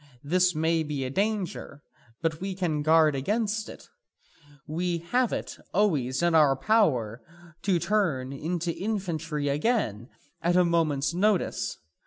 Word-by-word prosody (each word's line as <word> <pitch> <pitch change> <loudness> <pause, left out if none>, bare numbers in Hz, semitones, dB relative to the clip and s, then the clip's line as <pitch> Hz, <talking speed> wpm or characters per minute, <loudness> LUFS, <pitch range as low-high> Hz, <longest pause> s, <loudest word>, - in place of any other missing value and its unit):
This 180 +3 +2
may 160 +1 +1
be 150 -3 -3
a 130 - -4
danger, 195 -6 -2 0.4
but 160 0 -1
we 195 0 -3
can 165 -5 -1
guard 155 0 +4
against 210 - -1
it. - - -12 0.8
We 170 +3 -1
have 240 +9 0
it - - -4 0.2
always 150 -9 +1
in 175 -1 +3
our 150 -4 +5
power 130 - +1 0.4
to 190 -3 +2
turn 160 -10 0
into 170 +4 -3
infantry 170 -8 -3
again 140 - 0 0.3
at 175 +1 +1
a 180 -1 +5
moment's 165 -3 +1
notice. 200 +1 0
165 Hz, 135 wpm, -27 LUFS, 145-195 Hz, 0.8 s, our